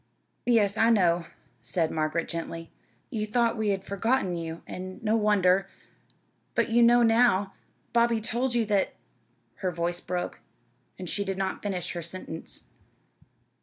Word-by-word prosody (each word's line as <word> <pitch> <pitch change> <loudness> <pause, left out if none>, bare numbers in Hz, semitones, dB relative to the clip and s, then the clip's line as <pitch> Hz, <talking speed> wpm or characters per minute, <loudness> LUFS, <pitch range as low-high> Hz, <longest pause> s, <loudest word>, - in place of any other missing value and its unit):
"Yes, 215 -4 +3
I 225 - +5
know," 175 -6 +3 0.4
said 165 -3 0
Margaret, 155 +1 -1
gently. 165 0 -5 0.4
"You 215 -1 -2
thought 235 +1 +2
we 220 -2 0
had 195 -1 0
forgotten 200 -1 0
you, 165 -1 -5
and 185 0 -7
no 215 0 +2
wonder. 195 -3 +3 0.9
But - - +2
you 235 +1 +4
know 240 +1 +6
now? 225 -4 +4 0.4
Bobby 235 -1 +3
told 240 +3 -1
you 235 -2 +2
that 205 -2 +1 0.3
" - - -42
her 185 - +1
voice 175 0 -2
broke, 180 0 -3 0.6
and 185 - -6
she 200 - -1
did 195 -1 -3
not 190 -1 -2
finish 185 -4 -3
her 175 - -4
sentence. 170 -1 -5
195 Hz, 150 wpm, -27 LUFS, 175-225 Hz, 0.9 s, know